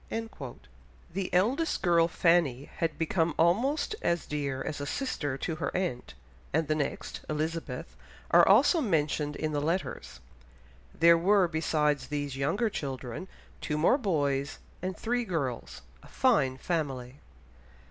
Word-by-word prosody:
The 190 0 -3
eldest 250 - +1
girl, 170 -2 +4
Fanny, 165 -6 +2
had 165 -1 -1
become 165 0 0
almost 255 - +2
as 170 0 0
dear 140 -3 -3
as 150 - -4
a 145 - -4
sister 145 - -2
to 160 +2 -3
her 145 -4 -2
aunt, 150 - -3 0.4
and 160 +1 +1
the 155 - +2
next, 150 -2 -3
Elizabeth, 155 - -3 0.4
are - - +7
also 275 - +5
mentioned 150 - 0
in 155 +1 -2
the 145 -1 -1
letters; 145 - -3 0.7
there 170 +1 +5
were 190 +1 +4
besides 155 -3 0
these 145 -2 -3
younger 145 - 0
children, 135 - -5 0.3
two 150 - -2
more 175 - +4
boys 145 - 0 0.2
and 185 +1 -3
three 245 +1 -1
girls, 135 - -4 0.2
a - - -16
fine 150 - +2
family! 135 -5 -3
160 Hz, 135 wpm, -29 LUFS, 140-185 Hz, 0.7 s, are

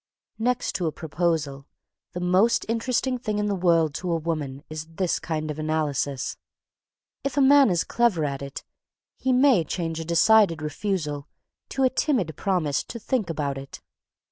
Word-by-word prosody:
Next 250 +2 0
to 175 -3 -1
a - - 0
proposal, 155 -3 -2 0.5
the 180 - -4
most 185 +6 +3
interesting 250 +3 0
thing 215 -4 -2
in 210 - 0
the 205 - 0
world 165 -4 +3
to 180 -1 -2
a 165 - +2
woman 150 -4 -3
is 155 0 -6
this 170 +2 -1
kind 155 -2 -3
of 150 - -7
analysis. 150 -3 -1 0.9
If 275 0 -3
a - - +5
man 275 -1 +7
is 175 -3 +1
clever 230 -10 +1
at 140 -1 -3
it, 140 0 -7 0.6
he 260 - +1
may 255 -7 +5
change 165 0 -3
a - - -3
decided 170 +1 +4
refusal 150 -2 -3 0.4
to 270 - -1
a 260 - +5
timid 235 - 0
promise 170 -7 0
to 235 - -7
"think 230 -4 -1
about 140 -4 -2
it." 135 0 -10
170 Hz, 170 wpm, -25 LUFS, 155-220 Hz, 0.9 s, man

